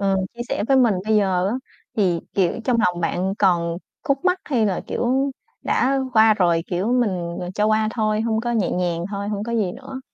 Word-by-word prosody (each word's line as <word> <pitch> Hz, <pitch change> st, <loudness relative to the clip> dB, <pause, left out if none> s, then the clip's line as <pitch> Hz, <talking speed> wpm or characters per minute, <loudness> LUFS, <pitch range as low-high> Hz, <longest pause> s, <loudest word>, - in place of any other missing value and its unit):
ờ, 195 Hz, -1 st, +2 dB, 0.2 s
chia 240 Hz, -, -11 dB
sẻ -, -, -1 dB
với 270 Hz, -, +5 dB
mình 240 Hz, -5 st, +4 dB
bây 215 Hz, 0 st, +2 dB
giờ 190 Hz, -3 st, +2 dB
á, 215 Hz, -, -1 dB, 0.4 s
thì, 180 Hz, -6 st, +2 dB
kiểu, 185 Hz, -3 st, +2 dB
trong 250 Hz, -2 st, +2 dB
lòng 175 Hz, -1 st, 0 dB
bạn 185 Hz, +3 st, -1 dB
còn 170 Hz, -3 st, +2 dB, 0.3 s
khúc 275 Hz, -1 st, 0 dB
mắc 365 Hz, 0 st, +3 dB
hay 240 Hz, -7 st, +1 dB
là, 190 Hz, -3 st, -1 dB
kiểu, 265 Hz, +3 st, 0 dB, 0.3 s
đã 270 Hz, +2 st, +1 dB
qua 220 Hz, -1 st, +6 dB
rồi, 170 Hz, -5 st, +2 dB
kiểu, 190 Hz, +6 st, 0 dB
mình, 185 Hz, -9 st, 0 dB
ờ, 180 Hz, -, -4 dB
cho 210 Hz, -, +1 dB
qua 215 Hz, 0 st, +2 dB
thôi, 215 Hz, -2 st, +1 dB
hông 220 Hz, -1 st, 0 dB
có 240 Hz, +1 st, -2 dB
nhẹ 215 Hz, -6 st, +1 dB
nhàng 175 Hz, -2 st, -1 dB
thôi, 200 Hz, 0 st, -4 dB
hông 205 Hz, -1 st, -2 dB
có 235 Hz, -, -4 dB
gì 210 Hz, -6 st, 0 dB
nữa. 265 Hz, +1 st, -8 dB
210 Hz, 220 wpm, -22 LUFS, 180-235 Hz, 0.4 s, qua